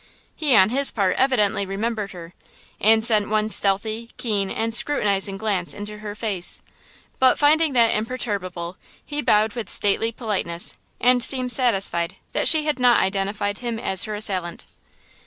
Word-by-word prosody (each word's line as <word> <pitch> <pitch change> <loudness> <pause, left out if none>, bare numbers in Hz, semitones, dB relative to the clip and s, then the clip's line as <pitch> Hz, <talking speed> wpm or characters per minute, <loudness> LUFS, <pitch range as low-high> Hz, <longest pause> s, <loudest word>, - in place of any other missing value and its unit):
He 290 -6 +2
on 190 -1 +5
his 275 +2 +3
part 195 -4 -1
evidently 235 -7 +1
remembered 205 +1 -4
her, 175 -1 -11 0.5
and 220 +1 +3
sent 215 -3 +3
one 215 0 0
stealthy, 215 +3 +1
keen 205 -5 -2
and 225 +2 -3
scrutinizing 200 -6 +2
glance 195 -5 -1
into 210 +1 -8
her 210 -1 -7
face; 200 -5 -1 0.6
but, 260 -1 +4
finding 305 0 +3
that 235 -2 +3
imperturbable, 200 -7 -4 0.3
he 295 0 -4
bowed 215 -4 +2
with 230 -6 -6
stately 215 +3 +1
politeness 200 -7 -3 0.2
and 250 0 +3
seemed 255 -1 +3
satisfied 195 -8 0 0.2
that - - 0
she 315 -2 +6
had 300 -4 -2
not 245 -1 +4
identified 200 +1 -2
him 235 -2 -4
as 190 -4 -2
her 215 -1 -5
assailant. 185 -5 -1
215 Hz, 155 wpm, -22 LUFS, 195-240 Hz, 0.6 s, she